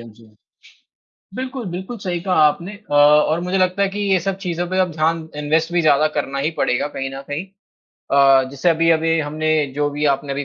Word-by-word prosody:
हाँ 115 - -11
जी, 115 +1 -20 1.1
बिल्कुल, 255 -1 -5
बिल्कुल, 190 +7 -6
सही 180 -3 -3
कहा 185 -1 -1
आपने 170 +7 -3
अ, 205 -7 -10
और 150 +2 +4
मुझे 180 +2 -1
लगता 185 +1 +1
है 200 - +3
कि 205 +2 -6
ये 185 - +4
सब 195 +2 -3
चीज़ों 175 -2 -3
पे 185 - -2
अब 180 -2 +1
ध्यान 160 +1 -1
इन्वेस्ट 160 +3 0
भी 175 - +2
ज़्यादा 155 0 +3
करना 140 -2 -2
ही 150 +4 -1
पड़ेगा 125 +4 0
कहीं 135 0 -3
न 135 - -7
कहीं 155 +6 -4 0.7
अ, 135 -1 +5
जैसे 140 +5 0
अभी-अभी 165 0 +2
हमने 155 +1 -2 0.2
जो 145 0 0
भी 145 +1 -3
आपने 140 +1 -6
अभी 140 +1 -3
160 Hz, 205 wpm, -19 LUFS, 145-180 Hz, 1.1 s, अ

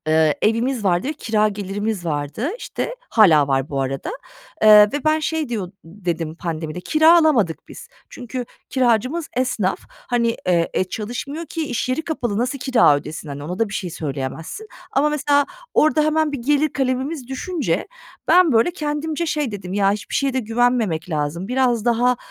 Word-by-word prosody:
eee, 155 -1 +3
evimiz 230 +2 +1
vardı 180 +4 +1
ve - - 0
kira 215 -7 +1
gelirimiz 205 -1 -3
vardı, 150 - -2
işte. - - -4 0.2
Hâlâ 160 - +5
var 135 0 0
bu 140 -1 -2
arada. 135 - -3 0.5
Eee, 215 -1 +9
ve 290 - -3
ben 310 0 +3
şey 315 -2 -2
diyor 200 -6 -4
dedim 165 -3 -4
pandemide, 165 0 -5
kira 315 - +5
alamadık 245 - +1
biz. - - -11 0.2
Çünkü 250 0 -6 0.3
kiracımız 255 +5 +1
esnaf. 245 -7 0 0.3
Hani, 235 -1 +1
eee, 175 +1 +1
çalışmıyor 260 - -5
ki 320 -1 -4
iş 245 -2 -2
yeri 255 +5 -1
kapalı, 240 -10 -2
nasıl 255 +4 -1
kira 245 - +4
ödesin, 150 +2 -7
hani, 145 0 -6
ona 180 +5 -5
da 225 - +1
bir 195 - -7
şey 185 -3 -3
söyleyemezsin 155 - -5 0.2
ama 285 +2 +3
mesela 285 -1 +2 0.3
orada 310 0 +4
hemen 310 0 +1
bir 285 - -3
gelir 295 +5 +2
kalemimiz 265 +1 -2
düşünce 265 - -2 0.4
ben, 360 -4 +6
böyle, 230 +9 +4
kendimce 310 0 -3
şey 300 -6 -1
dedim, 185 -3 -6
“Ya, 200 -1 +3
hiçbir 205 -2 -5
şeye 275 -1 +1
de 260 - 0
güvenmemek 225 -7 0
lazım, 155 +6 -2
biraz 250 -3 +1
daha, 245 +1 +2
230 Hz, 165 wpm, -21 LUFS, 180-285 Hz, 0.5 s, Eee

